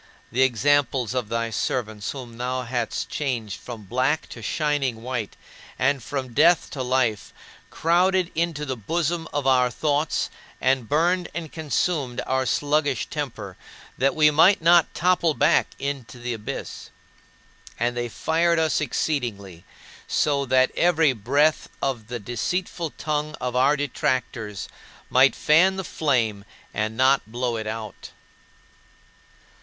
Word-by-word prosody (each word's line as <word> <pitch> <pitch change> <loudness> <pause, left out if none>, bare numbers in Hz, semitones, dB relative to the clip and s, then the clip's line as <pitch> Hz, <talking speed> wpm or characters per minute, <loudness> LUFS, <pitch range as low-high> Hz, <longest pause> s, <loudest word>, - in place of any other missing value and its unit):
The 130 - +1
examples 130 -1 +2
of 125 -5 -2
thy 115 0 -1
servants 110 -1 -2
whom 125 -4 -7
thou 125 +1 -2
hadst 120 -1 -2
changed 120 -8 -3
from 115 -3 -9
black 130 +9 0
to 115 - -9
shining 135 -2 -1
white, 125 -4 -4 0.4
and 140 +1 +1
from 130 0 -5
death 165 +6 +4
to 135 - -4
life, 125 -5 0 0.4
crowded 180 +2 +2
into 165 -2 -1
the 130 -2 -3
bosom 165 +8 -2
of 145 -2 -2
our 130 -2 +4
thoughts 150 +4 0 0.3
and 130 -2 +1
burned 175 +4 +2
and 165 -3 -5
consumed 150 -4 -1
our 130 0 0
sluggish 145 +1 0
temper, 110 -10 -5 0.4
that 135 +2 +1
we 155 -1 +5
might 170 +7 +5
not 170 +1 +5
topple 175 -3 +2
back - - +3
into 135 -4 -5
the 120 0 -4
abyss. 110 -2 -6 0.9
And 120 +1 0
they 120 0 -2
fired 165 +7 +1
us 160 -1 +1
exceedingly, 110 - -3 0.4
so 140 -2 +1
that 130 0 +3
every 160 -5 +3
breath 140 +8 +1
of 120 -6 -2
the 120 0 -4
deceitful 160 - -3
tongue 150 0 -2
of 125 -1 -3
our 135 +4 +4
detractors 125 -6 -2 0.4
might 130 +1 +5
fan 180 +5 +4
the 190 - -3
flame 120 - 0 0.3
and 110 +1 -2
not 130 +1 +4
blow 120 0 -1
it 110 -1 -4
out. 110 -1 -6
130 Hz, 135 wpm, -24 LUFS, 120-155 Hz, 0.9 s, we